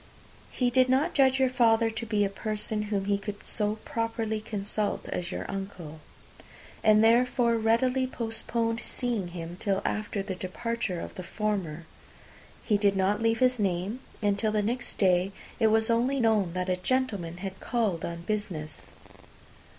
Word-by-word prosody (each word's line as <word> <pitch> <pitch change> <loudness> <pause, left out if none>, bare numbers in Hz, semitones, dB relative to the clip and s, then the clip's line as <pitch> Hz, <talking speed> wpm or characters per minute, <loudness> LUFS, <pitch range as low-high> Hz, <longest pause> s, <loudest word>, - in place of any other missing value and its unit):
He 250 -1 0
did 255 +1 +4
not 280 +7 +2
judge 265 -1 +4
your 265 - +4
father 230 -2 +4
to 225 +1 -5
be 210 -2 +2
a - - -1
person 210 +1 -2
whom 200 -2 0
he 200 0 +1
could 205 0 -7
so 210 0 0
properly 225 -1 -2
consult 210 -1 -2
as 175 0 -3
your - - -4
uncle, 185 -6 -6 0.8
and 215 0 +6
therefore 235 +1 +4
readily 250 +4 +2
postponed 230 -1 -2
seeing 235 -8 -2
him 175 0 -7
till 195 -2 +1
after 210 -1 -2
the 195 -1 -4
departure 190 +1 -3
of - - -6
the 185 - -7
former. 180 -6 -2 0.8
He 210 -3 +2
did 200 -1 +3
not 200 +3 +1
leave 225 0 +2
his 255 0 +3
name, 195 +4 -1 0.2
and 205 -1 +2
till 215 0 +1
the 210 -1 +1
next 240 +3 -2
day 185 0 +3 0.3
it 225 - +5
was 220 +1 +3
only 250 +4 +2
known 215 -7 +2
that 180 0 -2
a 185 -1 +1
gentleman 195 -6 -1
had 190 0 -6
called 215 -9 -1
on 170 0 -4
business. 175 -7 -4
215 Hz, 165 wpm, -28 LUFS, 195-230 Hz, 0.8 s, and